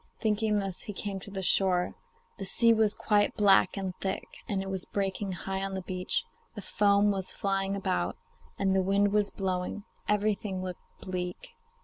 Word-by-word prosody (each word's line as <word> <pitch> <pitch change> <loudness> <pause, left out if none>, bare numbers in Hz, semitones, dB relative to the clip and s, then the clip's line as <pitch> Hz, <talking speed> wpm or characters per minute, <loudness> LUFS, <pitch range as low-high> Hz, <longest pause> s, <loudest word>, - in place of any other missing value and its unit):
Thinking 215 -1 +1
this 195 -3 -3
he 210 - -6
came 200 0 -3
to 195 - -9
the 190 -1 -4
shore. 180 -1 +3 0.5
The 195 - -4
sea 230 +4 +4
was 220 -2 +2
quite 205 -1 +2
black 200 -2 +5
and 190 -2 -2
thick, 190 0 -1 0.3
and 195 -2 0
it - - -7
was 190 -1 0
breaking 195 0 -2
high 190 +1 -3
on 195 0 -3
the 190 - -4
beach; 185 0 -1 0.3
the 205 - -6
foam 205 +1 +3
was 190 -2 -3
flying 195 0 0
about, 90 - -1 0.4
and 190 -1 +2
the 190 - +4
wind 200 +2 +2
was 210 -1 +3
blowing; 185 +1 -2 0.2
everything 205 -2 0
looked 185 -1 -5 0.2
bleak. 180 -1 -4
195 Hz, 175 wpm, -29 LUFS, 190-205 Hz, 0.5 s, black